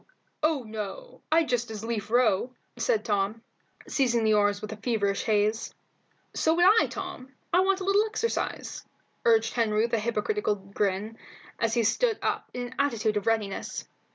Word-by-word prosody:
"Oh 310 -4 +1
no, 220 - -7
I'd 320 0 +4
just 240 -1 0
as 220 -1 -6
lief 225 -3 -3
row," 240 0 +2 0.2
said 465 -4 0
Tom, 205 +1 0 0.4
seizing 240 -4 +1
the 215 0 +4
oars 205 -1 +3
with 215 +1 -6
feverish 205 -5 0
haste. 215 0 +1 0.6
"So 320 +1 +2
would 350 +1 +4 0.2
I, - - +1
Tom; 360 -9 -7 0.2
I 360 - +6
want 385 +1 +2
a - - -2
little 400 +3 +3
exercise," 445 +1 -3 0.4
urged 225 -1 +4
Henry 220 -2 +2
with 235 0 -2
a 230 - +3
hypocritical 235 - 0
grin, 200 +2 -3 0.4
as 230 0 +1
he 235 - +3
stood 440 - +2
up - - -1
in 245 - -4
an 245 +1 -8
attitude 230 -6 +1
of 205 0 -2
readiness. 215 -3 -1
230 Hz, 165 wpm, -27 LUFS, 210-285 Hz, 0.6 s, I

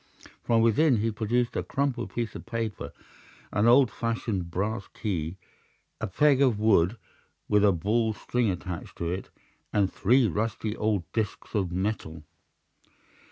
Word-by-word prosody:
From 115 -1 +3
within 125 +4 +4
he 110 +2 0
produced 115 +3 0
a - - 0
crumpled 135 -3 -2
piece 115 -2 -2
of - - -9
paper, 115 -2 -4 0.6
an 105 +3 +2
old 120 -1 +6
fashioned 115 -6 -2
brass 100 +4 -2
key, 90 -4 -3 0.6
a - - -2
peg 140 +7 +3
of 125 -6 +4
wood 105 -1 +3 0.5
with 105 0 +3
a 105 - +6
ball 110 +7 +1
of 110 - -4
string 120 -3 0
attached 90 -2 -5
to 85 0 -2
it, 95 +2 -4 0.4
and 100 -2 +1
three 125 +5 +4
rusty 110 +3 -2
old 105 -5 0
disks 110 -3 -3
of 95 -5 0
metal. 90 -4 -3
110 Hz, 150 wpm, -27 LUFS, 95-115 Hz, 0.6 s, old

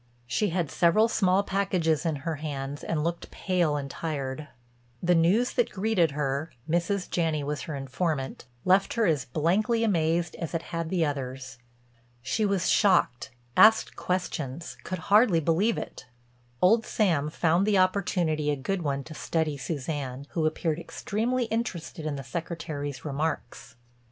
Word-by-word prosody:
She 205 - 0
had 170 -3 -1
several 195 +6 +4
small 195 -3 +2
packages 180 -5 0
in 160 - 0
her 165 -2 -1
hands 145 -2 -5
and 155 -2 -1
looked 170 +1 -3
pale 175 -6 0
and 140 -1 -4
tired. 140 -1 -4 0.6
The 175 0 +4
news 180 +9 +3
that 245 -2 +2
greeted 190 -4 +1
her—Mrs. 155 - -1
Janney 160 -4 0
was 145 +1 -3
her 155 - -5
informant—left 135 +3 -1
her 230 -2 +2
as 150 -8 +1
blankly 190 - +1
amazed 170 -4 +1
as 165 0 -4
it 165 - -2
had 165 -1 -2
the 175 -3 +2
others. 130 -3 -5 0.6
She 210 - 0
was 195 -3 0
shocked, 185 - +3 0.3
asked 220 +1 +6
questions, 165 -4 -3
could 185 - -4 0.2
hardly 210 -6 +6
believe 170 +9 +2
it. 130 - -7 0.6
Old 225 +5 +5
Sam 165 -11 +1
found 170 +5 +2
the 205 -2 +4
opportunity 180 -5 +1
a 145 - +2
good 175 +8 -2
one 140 -3 -1
to 155 - -10
study 160 -1 -1
Suzanne, 140 -2 -4
who 160 -2 +1
appeared 155 0 -1
extremely 230 +8 -1
interested 175 -8 -3
in 150 - -2
the 135 - -6
Secretary's 145 -2 -5
remarks. 145 -5 -3
165 Hz, 145 wpm, -27 LUFS, 145-185 Hz, 0.6 s, asked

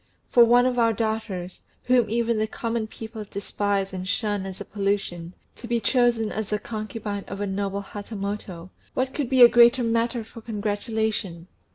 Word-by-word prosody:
For 240 - +8
one 240 +1 +5
of 250 -1 +1
our 230 -1 +4
daughters, 215 -5 -3 0.2
whom 245 -3 +3
even 230 0 +1
the 215 - +1
common 230 0 -3
people 220 0 -8
despise 200 -1 -2
and 185 0 -5
shun 205 -1 -1
as 190 0 -8
a - - -6
pollution, 195 -4 -2 0.2
to 235 - -9
be 235 0 +1
chosen 240 -3 +2
as 215 -1 -4
the 210 - +1
concubine 215 -2 -5
of 195 - -6
a 205 - -1
noble 200 0 -2
Hatamoto 200 -4 -6 0.2
what 260 +1 0
could 280 -5 -2
be 260 -2 +7
a - - +12
greater 240 +1 +6
matter 230 +1 0
for 225 +1 -12
congratulation!" 210 -4 -2
215 Hz, 175 wpm, -25 LUFS, 200-235 Hz, 0.2 s, a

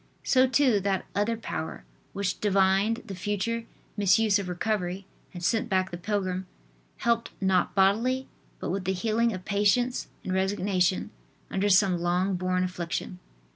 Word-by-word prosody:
So, 260 0 +4
too, 260 -5 +3
that 195 -1 -1
other 215 +3 0
power, 80 - -5 0.3
which 200 -1 -2
divined 200 +2 +2
the 195 - -7
future 205 +5 -2 0.3
misuse 205 +1 +3
of 190 -2 -4
recovery 185 0 -2 0.3
and 175 -1 -8
sent 225 +5 +1
back 190 -1 +1
the 175 - -5
pilgrim, 185 -1 -2 0.5
helped, 235 0 +1
not 190 -2 +1
bodily, 230 +7 +2 0.3
but - - -3
with 190 0 -3
the 190 - +1
healing 225 +4 +1
of 185 -2 -6
patience 210 +5 +1 0.2
and 185 - -3
resignation, 190 -1 +1 0.4
under 200 +2 +1
some 185 -2 +4
long 180 +3 +1
borne 185 0 0
affliction. 180 0 -4
195 Hz, 145 wpm, -27 LUFS, 185-215 Hz, 0.5 s, So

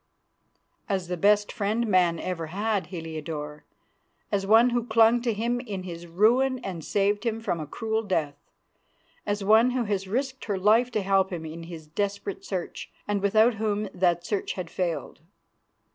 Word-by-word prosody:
"As 190 -3 -1
the 180 - -1
best 205 +3 +3
friend 220 +2 -1
man 180 -5 +3
ever 165 -3 -3
had, 205 +3 -1
Heliodore; 155 -3 -6 0.7
as 195 -1 0
one 230 +4 +6
who 240 -1 -1
clung 225 +1 +5
to 240 -1 0
him 235 +3 -1
in 205 -7 -5
his 175 -1 -8
ruin 240 +9 +3
and 175 -5 -5
saved 205 +3 +1
him 225 -2 -1
from 175 -6 -2
a 155 - -5
cruel 220 +6 -2
death; 165 -9 -1 0.9
as 205 0 -1
one 220 +4 +5
who 250 -1 0
has 200 -3 -2
risked 260 +5 -2
her 205 -3 -1
life 220 +6 +4
to 215 - 0
help 195 0 +2
him 165 -3 -5
in 160 +1 -7
his 165 -2 -9
desperate 200 +4 -3
search, 185 -3 -5 0.2
and 205 -1 0
without 215 +4 +4
whom 210 -1 -1
that 175 -1 +1
search 205 0 -2
had 180 -3 -6
failed." 175 -3 -3
200 Hz, 170 wpm, -26 LUFS, 175-220 Hz, 0.9 s, one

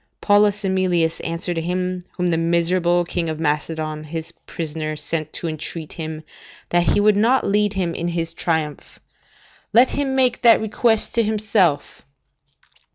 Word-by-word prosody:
Paulus 205 0 +3
Emilius 180 -4 +1
answered 170 +1 -3
him 180 +2 -2
whom 180 - -1
the 175 -2 +2
miserable 170 +1 +1
King 170 -1 -2
of 155 -1 -4
Macedon, 155 0 -2
his 165 +1 -5
prisoner, 155 -2 -5
sent 155 +1 -3
to 170 - -3
entreat 155 0 -5
him 155 -2 -6 0.5
that 175 0 +3
he - - +3
would 210 0 +4
not 235 +6 +3
lead 205 0 +1
him 180 -4 -1
in 170 - -3
his 165 -1 -3
triumph, 160 -4 -3 0.8
"Let 245 +3 +6
him 275 -2 -1
make 255 -2 +2
that 235 -2 +6
request 220 +1 0
to 235 - +3
himself." 210 -8 0
175 Hz, 150 wpm, -21 LUFS, 160-205 Hz, 0.8 s, Let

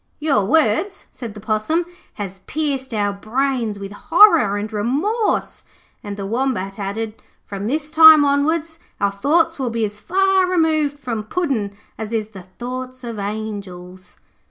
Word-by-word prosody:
'Your 290 -9 +1
words,' 320 - +1
said 230 -4 -8
the - - -8
Possum, 220 - 0 0.3
'has 195 -2 -6
pierced 280 -4 -2
our 205 -2 0
brains 230 +1 -1
with 200 0 -7
horror 315 - +5
and 210 +2 -5
remorse'; 305 - -1 0.4
and 205 -1 -6
the 200 - -4
Wombat 215 -4 -2
added: 215 +2 -4 0.2
'From 200 0 -5
this 300 +4 -2
time 315 -1 +9
onwards 315 +3 0 0.2
our 200 0 +1
thoughts 320 +10 +1
will 260 -2 -1
be 230 -1 -1
as 210 0 -7
far 380 - +2
removed 315 -5 +1
from 235 -6 -4
Puddin' 225 - -2 0.2
as 220 +1 -5
is 220 -2 -1
the 195 -4 -11
thoughts 255 +6 -7
of 230 -3 -6
angels.' 200 -3 -6
235 Hz, 150 wpm, -20 LUFS, 205-310 Hz, 0.4 s, time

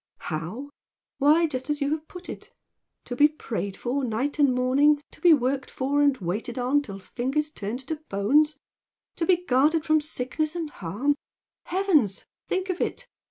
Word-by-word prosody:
"How? 180 - -5 0.5
Why, 305 +4 +5
just 260 -3 -4
as 295 -1 0
you 285 0 0
have 310 0 -3
put 360 -1 -11
it, - - -9 0.5
to 245 - -5
be 290 +4 +6
prayed 220 -10 -5
for 265 +3 -2
night 255 +6 -2
and 285 -3 +5
morning, 265 +4 +3
to - - -16
be 350 - +7
worked 270 -2 +2
for 280 +2 0
and 285 -2 +4
waited 210 +6 -4
on 255 +4 +2
till 200 -8 -8
fingers 265 +10 -2
turned 220 +1 -4
to 305 +4 -4
bones, 290 +11 +3 0.6
to 330 - -1
be 360 -1 +3
guarded 300 +5 +3
from 310 0 +3
sickness 305 +2 -2
and 325 -3 -3
harm, 210 - -1 0.5
heavens! 330 - +1 0.2
think 375 0 -1
of 365 - -5
it! - - -2
285 Hz, 170 wpm, -26 LUFS, 245-310 Hz, 0.6 s, be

